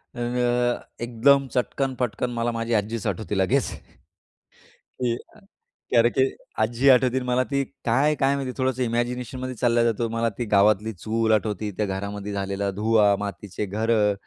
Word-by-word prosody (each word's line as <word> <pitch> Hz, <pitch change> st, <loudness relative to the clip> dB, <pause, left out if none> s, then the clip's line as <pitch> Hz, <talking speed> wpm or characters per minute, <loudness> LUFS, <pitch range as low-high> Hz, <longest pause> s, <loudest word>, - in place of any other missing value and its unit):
अ, -, -, -7 dB, 0.8 s
एकदम 135 Hz, +4 st, +3 dB
चटकन-पटकन 125 Hz, -1 st, -1 dB
मला 120 Hz, 0 st, -1 dB
माझी 115 Hz, 0 st, -2 dB
आजीच 110 Hz, +1 st, -1 dB
आठवती 110 Hz, -2 st, -3 dB
लगेच, 125 Hz, +8 st, +2 dB, 1.4 s
की 120 Hz, -2 st, +1 dB
अ, 215 Hz, -, -14 dB
कारण 205 Hz, -, -24 dB, 0.5 s
की -, -, +1 dB
अरे! 115 Hz, 0 st, +6 dB
की 130 Hz, +2 st, +1 dB, 0.3 s
आजी 120 Hz, +5 st, +3 dB
आठवती 130 Hz, -1 st, +5 dB
आणि 130 Hz, -, -2 dB
मला 125 Hz, +1 st, +2 dB
ती 140 Hz, 0 st, +1 dB, 0.2 s
काय, 140 Hz, +6 st, +3 dB
काय 140 Hz, -1 st, +2 dB
माहिती 135 Hz, -2 st, -3 dB
थोडंस 130 Hz, -1 st, 0 dB
इमॅजिनेशनमध्ये 125 Hz, +1 st, -2 dB
चालला 120 Hz, 0 st, +2 dB
जातो. 115 Hz, 0 st, 0 dB
मला 115 Hz, +1 st, 0 dB
ती 120 Hz, -, -2 dB
गावातली 105 Hz, +2 st, +3 dB
चूल 110 Hz, +4 st, -1 dB
आठवती. 105 Hz, -1 st, -1 dB
त्या 105 Hz, -, +1 dB
घरामध्ये 100 Hz, +1 st, -4 dB
झालेला 100 Hz, 0 st, -2 dB
धुवा, 105 Hz, 0 st, +3 dB
मातीचे 100 Hz, 0 st, -5 dB
घरं 105 Hz, +1 st, +1 dB
115 Hz, 155 wpm, -24 LUFS, 105-125 Hz, 1.4 s, अरे